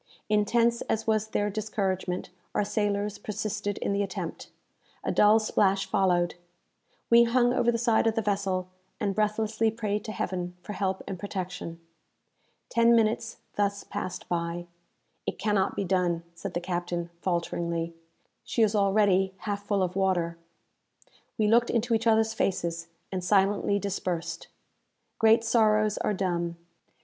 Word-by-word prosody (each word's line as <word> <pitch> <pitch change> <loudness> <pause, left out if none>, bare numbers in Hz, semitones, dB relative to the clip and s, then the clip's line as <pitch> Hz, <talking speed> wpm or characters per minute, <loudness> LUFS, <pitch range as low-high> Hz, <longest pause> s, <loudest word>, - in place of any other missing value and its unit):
Intense 230 +3 +3
as 220 - 0
was 220 -1 +1
their 205 -1 -1
discouragement, 195 -4 -2 0.2
our - - +3
sailors 205 0 -1
persisted 210 -1 -3
in - - -1
the 200 - +1
attempt. 195 -2 -5 0.5
A - - 0
dull 210 +1 +6
splash 195 -3 +2
followed. 180 -2 +2 0.8
We 235 0 +8
hung 245 +1 +3
over 240 -1 +3
the 230 - 0
side 230 -1 +3
of 225 - +1
the 225 - +1
vessel, 195 -2 0 0.3
and 200 -1 0
breathlessly 215 +1 +1
prayed 210 -2 -2
to 215 - -4
Heaven 180 -3 -3
for 210 - -6
help 190 -2 -2
and 190 -3 -5
protection. 185 -4 -5 0.9
Ten 235 0 +4
minutes 225 0 +1 0.2
thus 200 0 0
passed 180 - -5
by. 170 0 -2 0.6
"It - - -2
cannot 205 -2 +1
be - - -1
done," 175 -2 +1
said 170 - -7
the - - +1
captain, 175 -1 -3
falteringly; 170 -1 -1 0.5
"she 230 - +1
is 215 -1 +3
already 195 -2 +3
half 205 -1 -4
full 200 -2 +2
of 180 0 -2
water." 175 -3 0 1.0
We 215 - +2
looked 235 +2 +4
into 235 0 +1
each 225 +1 +1
others 220 0 +3
faces, 170 -5 -1 0.2
and 185 -2 -3
silently 200 +1 +3
dispersed. 190 -4 -3 0.7
Great 225 0 +5
sorrows 215 -2 +3
are 210 - 0
dumb. 175 -3 -1
200 Hz, 145 wpm, -28 LUFS, 185-220 Hz, 1.0 s, We